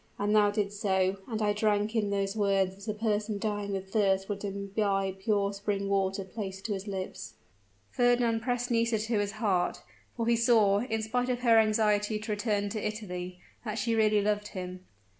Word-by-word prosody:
_ - - -1
and 210 +1 +2
thou 210 -1 +5
didst 205 0 -2
so 190 -2 +1
and 220 -2 -2
I 210 0 +2
drank 210 +1 +1
in 210 -2 +1
those 200 0 -1
words 195 -2 +1
as 200 +2 -13
a 215 - 0
person 210 -1 -1
dying 205 -1 -2
with 190 0 -5
thirst 195 -2 +2
would 200 0 -4
imbibe 195 -1 -1
pure 200 0 +1
spring 200 0 -2
water 195 0 0
placed 190 -1 -7
to 220 - -1
his 195 +1 -5
lips!" 190 -2 -5 0.6
Fernand 245 -2 +2
pressed 245 +1 -1
Nisida 230 -2 +1
to 220 -1 0
his 205 0 -1
heart 205 -5 0 0.3
for 230 - -1
he 235 0 +3
saw, 225 -4 +4
in 220 -1 -2
spite 245 +3 -1
of 250 -1 -1
her 230 -2 +6
anxiety 215 -1 +2
to 215 +1 -5
return 205 -1 0
to 215 0 -4
Italy, 180 -4 -5 0.2
that 215 -3 -3
she 230 +1 0
really 215 -2 +3
loved 210 0 0
him. 185 0 -6
210 Hz, 195 wpm, -29 LUFS, 195-220 Hz, 0.6 s, her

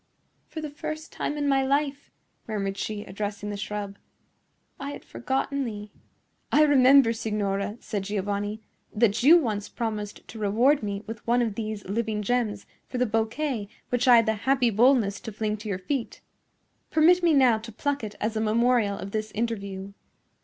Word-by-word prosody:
"For 315 - -6
the 305 -2 -5
first 310 +2 -6
time 295 - -3
in 290 -1 0
my 270 -1 +3
life," 280 +1 0 0.4
murmured 200 -3 -2
she, 205 +1 -4
addressing 205 +1 -5
the - - -4
shrub, 205 0 -5 0.8
"I 280 0 -5
had - - -10
forgotten 270 +2 -2
thee." 210 -3 -6 0.6
"I 305 - +6
remember, 270 -4 +6
signora," 210 -2 -2
said 200 -3 -4
Giovanni, 205 +1 -2 0.3
"that 215 -1 +2
you 310 +7 +8
once 215 -10 -2
promised 215 -3 -4
to 225 - -9
reward 235 +8 +3
me 200 -1 -4
with 225 0 -8
one 240 +1 +3
of 225 -3 -1
these 215 -1 -5
living 215 +1 -2
gems 215 -3 -1 0.2
for 255 - -5
the 250 - +2
bouquet 225 +1 -1 0.2
which 245 +1 0
I 245 - +9
had 230 -1 +5
the 220 - +2
happy 250 +2 +2
boldness 225 -2 +3
to 225 - -7
fling 210 0 -2
to 210 +1 -7
your 195 - -1
feet. 240 +7 -4 0.7
Permit 335 +3 +5
me 335 -3 +4
now 250 -5 +5
to 225 +1 -9
pluck 285 +4 -2
it 210 -1 -6
as 215 +1 -1
a 220 - 0
memorial 225 -1 +2
of 195 - -7
this 215 0 -2
interview." 200 -3 -3
220 Hz, 175 wpm, -26 LUFS, 205-265 Hz, 0.8 s, I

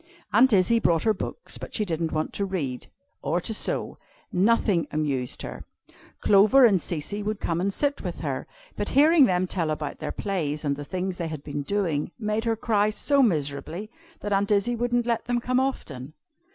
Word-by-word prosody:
Aunt 245 +5 +6
Izzie 210 +3 +4
brought 170 -6 +2
her 220 - +3
books, 210 - -6
but - - -8
she 215 - +1
didn't 165 -2 -2
want 155 0 -2
to 200 - -2
read, 155 -11 -3 0.3
or 155 +5 0
to 220 - -3
sew. - - -3 0.3
Nothing 195 -2 +2
amused 140 -5 -2
her. - - -7 0.6
Clover 210 +7 +6
and 195 -6 +4
Cecy 175 +6 -3
would 215 0 -3
come 170 0 -1
and 200 +2 0
sit 285 +7 -1
with - - -5
her, - - -3 0.3
but - - -3
hearing 305 0 +7
them 185 -3 +1
tell 175 -3 -2
about 150 -1 -3
their - - -4
plays, 155 -7 -2
and 140 -1 +1
the 145 - -6
things 185 +2 -3
they 170 - -3
had 155 -3 -6
been 145 0 -4
doing, 165 -3 -1
made 215 0 -2
her 230 -1 +1
cry 210 -2 +1
so 280 +6 +2
miserably, 165 - -1 0.3
that 205 - -2
Aunt 200 +1 +1
Izzie 210 +4 +2
wouldn't 240 0 0
let 235 -2 -1
them 245 0 0
come 250 +2 +1
often. 150 - -3
195 Hz, 190 wpm, -26 LUFS, 155-225 Hz, 0.6 s, hearing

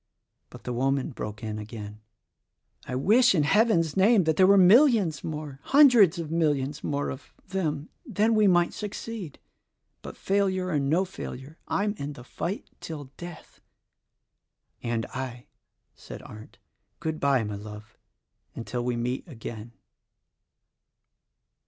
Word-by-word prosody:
But - - -13
the 125 - -4
woman 135 +4 0
broke 105 -3 -7
in 110 -1 -4
again: 105 0 -8 0.9
"I 125 - -3
wish 220 - +4
in 155 - +3
Heaven's 175 -3 +3
name 200 +1 +5
that 160 -1 +1
there 185 +3 +5
were 200 +1 +6
millions 200 - +5
more, 150 -3 -6
hundreds 245 - +6
of 165 -2 -5
millions 150 -3 0
more, 145 -1 -2
of 130 - -10 0.2
them; 155 -6 -2 0.2
then 225 - +1
we 215 -2 +4
might 175 -2 +3
succeed. 210 -4 -6 0.6
But, - - -9
failure 190 -2 0
or 155 -5 +1
no 155 +7 +1
failure, 155 -5 -9
I'm 205 +1 0
in 145 +1 -4
the 125 - -12
fight 175 +9 -5
till 145 -5 -8
death." 175 -1 -11 1.2
"And 115 -1 -2
I," 125 -2 -6 0.5
said - - -11
Arndt. 110 0 -12 0.4
"Good 160 -1 -3
bye, 140 -4 +2
my 105 -1 -4
love, 105 +1 -10 0.6
until 120 +1 -4
we 125 0 -1
meet 125 +7 -3
again. 115 -5 -8
155 Hz, 135 wpm, -27 LUFS, 125-190 Hz, 1.2 s, were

